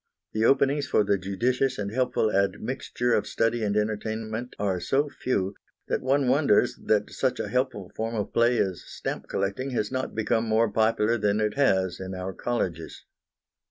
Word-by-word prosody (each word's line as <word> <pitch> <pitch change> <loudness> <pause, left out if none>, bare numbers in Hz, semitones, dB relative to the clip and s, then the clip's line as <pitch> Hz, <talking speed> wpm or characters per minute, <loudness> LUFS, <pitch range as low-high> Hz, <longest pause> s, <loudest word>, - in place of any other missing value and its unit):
The 110 +1 +1
openings 140 +2 +3
for 120 - +3
the 100 -1 +1
judicious 125 +8 0
and 100 -1 -3
helpful 125 -3 +1
admixture 115 +5 0
of - - +1
study 115 0 0
and 105 0 0
entertainment 110 +2 -3
are 95 -3 0
so 140 +9 +1
few, 100 -8 -1 0.4
that - - 0
one 135 +1 +2
wonders 130 -4 +3
that 105 -1 +2
such 130 -2 -1
a - - -3
helpful 125 -7 -1
form 115 +1 -3
of 105 -2 -3
play 120 +1 +3
as 95 -5 0
stamp - - -6
collecting 100 +8 -2
has 105 - -1
not 130 0 -3
become 115 +1 +1
more 110 0 +2
popular 110 +1 +2
than 105 0 +1
it 105 -1 +1
has 95 -10 +2
in 95 0 -5
our 95 +1 -4
colleges. 90 -10 -3
110 Hz, 170 wpm, -26 LUFS, 100-125 Hz, 0.4 s, openings